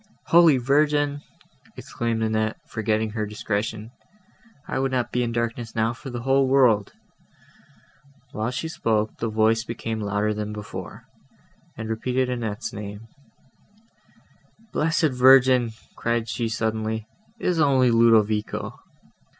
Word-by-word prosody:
"Holy 165 -4 +6
Virgin!" 145 +2 +1 0.6
exclaimed 115 -1 -3
Annette, 110 0 0
forgetting 110 0 -1
her 105 -1 -3
discretion, 105 +1 -3 0.8
"I - - -2
would 135 0 0
not 125 -2 -1
be 125 - 0
in 120 -1 -1
darkness 115 0 -3
now 115 +1 +1
for 135 +3 -9
the 120 -2 -6
whole 135 +1 +3
world." 125 -7 +3 1.4
While 110 +2 -2
she 125 +6 -3
spoke, 110 -8 -1
the 115 - -1
voice 110 +1 +2
became 115 -1 -4
louder 105 +1 0
than 105 0 -4
before, 105 -1 -8 0.7
and 110 0 -5
repeated 125 +3 -1
Annette's 115 -4 -4
name; 105 +2 -8 1.6
"Blessed 160 0 +1
Virgin!" 125 -2 +5 0.2
cried 115 -1 -1
she 115 +1 -2
suddenly, 110 -1 -2 0.3
"it - - -8
is 175 -2 +1
only 135 -5 +4
Ludovico." 110 -2 +2
115 Hz, 125 wpm, -24 LUFS, 110-130 Hz, 1.6 s, Holy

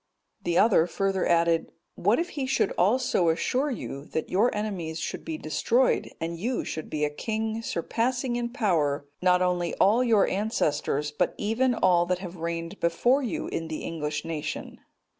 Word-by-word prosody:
The 175 -3 0
other 200 -6 +5
further 195 +1 0
added, 170 -1 +3 0.3
"What - - +2
if 345 +2 -1
he 275 -3 -3
should 265 -6 +1
also 200 -2 +2
assure 255 - +1
you, 140 - -5
that 160 - -4
your 210 +7 +4
enemies 185 -7 -3
should - - -4
be 160 - -4
destroyed, 235 +12 +1
and 165 0 -4
you 240 +6 -1
should 155 - -5
be 150 -1 0
a - - 0
king 220 +7 -3
surpassing 240 +6 -1
in 240 0 -1
power, 165 - 0 0.2
not 180 0 +4
only 180 -1 0
all 225 +6 +4
your 225 -5 +4
own - - -1
ancestors, 150 -7 0
but 150 - 0
even 240 +4 +1
all 175 -4 +3
that 180 0 +1
have 180 -1 -8
reigned 170 +3 -4
before 240 +11 +2
you 245 - -3
in 165 - -3
the 160 -1 -5
English 150 -2 -3
nation?" 160 -2 -5
180 Hz, 175 wpm, -27 LUFS, 165-230 Hz, 0.3 s, other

